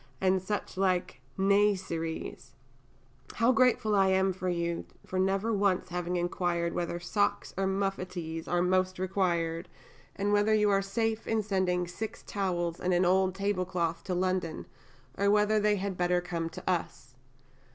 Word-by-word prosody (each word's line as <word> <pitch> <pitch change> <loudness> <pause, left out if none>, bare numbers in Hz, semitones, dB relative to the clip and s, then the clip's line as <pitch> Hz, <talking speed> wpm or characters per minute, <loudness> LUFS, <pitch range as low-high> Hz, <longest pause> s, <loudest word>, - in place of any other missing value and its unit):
and 190 0 +2
such 205 0 -4
like 180 -9 0 0.2
niaiseries. 190 -8 0 0.8
How 230 +2 +4
grateful 235 -3 +3
I 195 -1 +4
am 190 0 +2
to 185 0 -5
you 170 -1 -2 0.2
for 185 - -3
never 195 +4 +1
once 200 -3 +1
having 180 0 -2
inquired 175 -1 -1
whether 175 0 -2
socks 205 +4 -1
or 195 0 0
muffetees 185 -4 -3
are 175 0 +1
most 185 0 +1
required, 175 -2 -1 0.5
and 205 +1 0
whether 205 +1 +4
you 210 -1 +3
are 195 0 +3
safe 220 +3 -2
in 220 -1 +1
sending 185 -3 0
6 215 +5 -6
towels 175 -4 -2
and 180 0 +1
an 180 +1 +3
old 185 +1 +3
tablecloth 185 -4 -1
to 185 - -1
London, 185 -3 -1 0.5
or 200 0 +3
whether 210 +1 +4
they 210 0 +3
had 195 -1 -3
better 180 0 +2
come 170 -2 -3
to - - -10
us. 165 -7 -2
185 Hz, 150 wpm, -30 LUFS, 175-200 Hz, 0.8 s, How